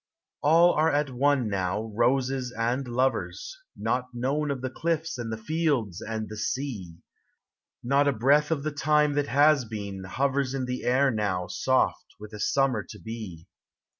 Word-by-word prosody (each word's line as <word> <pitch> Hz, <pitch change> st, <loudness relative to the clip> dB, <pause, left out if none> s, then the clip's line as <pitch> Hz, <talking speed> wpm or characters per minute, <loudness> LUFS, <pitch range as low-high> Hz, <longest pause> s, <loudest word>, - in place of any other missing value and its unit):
All 165 Hz, +4 st, +5 dB
arc 150 Hz, -2 st, +2 dB
;it -, -, -9 dB
one 135 Hz, -1 st, +2 dB
now, 100 Hz, +1 st, -1 dB
roses 125 Hz, +2 st, +1 dB
and 120 Hz, +3 st, -1 dB
lovers, 130 Hz, -, -1 dB, 0.2 s
Not 125 Hz, 0 st, -1 dB
known 140 Hz, +5 st, -1 dB
of 135 Hz, -3 st, -2 dB
the 130 Hz, -1 st, -3 dB
cliffs 160 Hz, -1 st, -2 dB
and 115 Hz, -1 st, -4 dB
the 110 Hz, -, -3 dB
fields 120 Hz, -, -1 dB
and 110 Hz, -1 st, -4 dB
the 110 Hz, -, -8 dB
sea. 110 Hz, -7 st, -3 dB, 0.9 s
Not 140 Hz, +3 st, +3 dB
a -, -, +4 dB
breath 140 Hz, +5 st, +3 dB
of 155 Hz, -4 st, -1 dB
the 155 Hz, -1 st, -3 dB
lime 150 Hz, -1 st, +4 dB
that 145 Hz, 0 st, 0 dB
has 145 Hz, +1 st, +4 dB
been 100 Hz, -4 st, -6 dB
hovers 135 Hz, +4 st, 0 dB
In 130 Hz, -2 st, -2 dB
the 125 Hz, 0 st, -4 dB
air 130 Hz, +2 st, +3 dB
now 100 Hz, -5 st, -1 dB
soft -, -, 0 dB
with 105 Hz, +1 st, -10 dB
a 105 Hz, -, -7 dB
summer 130 Hz, -3 st, +1 dB
to -, -, -9 dB
be. 110 Hz, -8 st, -8 dB
130 Hz, 165 wpm, -27 LUFS, 110-145 Hz, 0.9 s, All